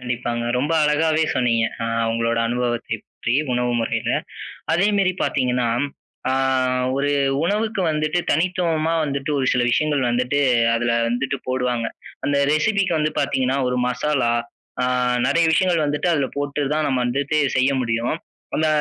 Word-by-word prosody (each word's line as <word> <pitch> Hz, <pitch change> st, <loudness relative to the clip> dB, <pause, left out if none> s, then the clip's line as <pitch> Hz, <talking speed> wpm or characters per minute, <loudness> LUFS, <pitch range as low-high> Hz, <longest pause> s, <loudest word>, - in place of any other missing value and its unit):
கண்டிப்பாங்க. 120 Hz, -1 st, -3 dB
ரொம்ப 145 Hz, +5 st, 0 dB
அழகாவே 155 Hz, +1 st, +2 dB
சொன்னீங்க! 115 Hz, -2 st, +2 dB, 0.2 s
அ -, -, -1 dB, 0.3 s
உங்களோட 115 Hz, 0 st, 0 dB
அனுபவத்தை 120 Hz, -1 st, -2 dB
பற்றி, 120 Hz, -, -3 dB, 0.2 s
உணவு 125 Hz, 0 st, 0 dB
முறையில. 115 Hz, -, -1 dB, 0.6 s
அதே 195 Hz, +5 st, +3 dB
மேரி 190 Hz, -2 st, +2 dB
பார்த்தீங்கன்னா, 125 Hz, -3 st, 0 dB, 0.6 s
அ -, -, +1 dB, 0.6 s
ஒரு 145 Hz, +1 st, +1 dB, 0.3 s
உணவுக்கு 210 Hz, +2 st, 0 dB
வந்துட்டு, 155 Hz, +3 st, 0 dB
தனித்துவமா 165 Hz, -1 st, +1 dB
வந்துட்டு 140 Hz, +1 st, -3 dB
ஒரு 130 Hz, -, 0 dB
சில 125 Hz, -, +1 dB
விஷயங்கள் 145 Hz, 0 st, +1 dB
வந்துட்டு 125 Hz, +4 st, 0 dB, 0.4 s
அதுல 120 Hz, 0 st, 0 dB, 0.2 s
வந்துட்டு 135 Hz, +3 st, -1 dB
போடுவாங்க. 125 Hz, -2 st, -1 dB, 0.4 s
அந்த 145 Hz, 0 st, +1 dB, 0.2 s
ரெசிபிக்கு 195 Hz, +3 st, +1 dB
வந்து 150 Hz, 0 st, +1 dB
பார்த்தீங்கன்னா, 130 Hz, +1 st, 0 dB
ஒரு 125 Hz, -, -1 dB
மசாலா 125 Hz, -1 st, 0 dB, 0.5 s
அ -, -, +2 dB, 0.4 s
நிறைய 165 Hz, +4 st, +3 dB
விஷயங்கள் 170 Hz, -1 st, +2 dB
வந்துட்டு 145 Hz, +4 st, -1 dB
அதில 145 Hz, -4 st, +1 dB
போட்டு 145 Hz, +1 st, -2 dB
தான் 155 Hz, 0 st, 0 dB
நம்ம 130 Hz, -2 st, 0 dB
வந்துட்டு 140 Hz, +4 st, 0 dB, 0.2 s
செய்ய 130 Hz, +2 st, +3 dB
முடியும். 115 Hz, +4 st, -1 dB, 0.4 s
அந்த 155 Hz, 0 st, +1 dB
140 Hz, 140 wpm, -21 LUFS, 125-155 Hz, 0.6 s, அதே